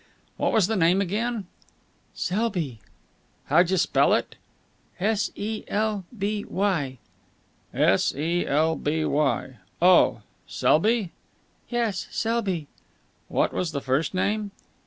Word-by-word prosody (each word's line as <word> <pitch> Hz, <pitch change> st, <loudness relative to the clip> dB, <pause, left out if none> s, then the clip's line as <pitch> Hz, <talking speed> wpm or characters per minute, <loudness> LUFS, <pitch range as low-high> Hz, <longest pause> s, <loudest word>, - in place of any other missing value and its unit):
"What -, -, +1 dB
was 220 Hz, -5 st, +4 dB
the 220 Hz, +3 st, -1 dB
name 180 Hz, 0 st, +3 dB
again?" 210 Hz, +3 st, -1 dB, 0.7 s
"Selby." 180 Hz, -, -2 dB, 0.7 s
"Howja 180 Hz, +2 st, +4 dB
spell 180 Hz, -, +3 dB
it?" -, -, -3 dB, 0.6 s
"S 205 Hz, +2 st, +1 dB
e 215 Hz, +1 st, -4 dB
l 210 Hz, -2 st, -1 dB
b 205 Hz, +1 st, -1 dB
y." 170 Hz, -10 st, -1 dB, 0.7 s
"S -, -, +2 dB
e 165 Hz, +5 st, -1 dB
l 160 Hz, +3 st, +2 dB
b 155 Hz, +1 st, -1 dB
y. 135 Hz, -3 st, 0 dB, 0.2 s
Oh, 180 Hz, +1 st, +5 dB, 0.2 s
Selby?" 210 Hz, +3 st, +2 dB, 0.6 s
"Yes, 230 Hz, -6 st, -1 dB
Selby." 210 Hz, -8 st, -1 dB, 0.6 s
"What -, -, 0 dB
was 175 Hz, -3 st, -2 dB
the 140 Hz, -, -1 dB
first 135 Hz, +7 st, 0 dB
name?" 205 Hz, +2 st, 0 dB
185 Hz, 115 wpm, -25 LUFS, 160-215 Hz, 0.7 s, Oh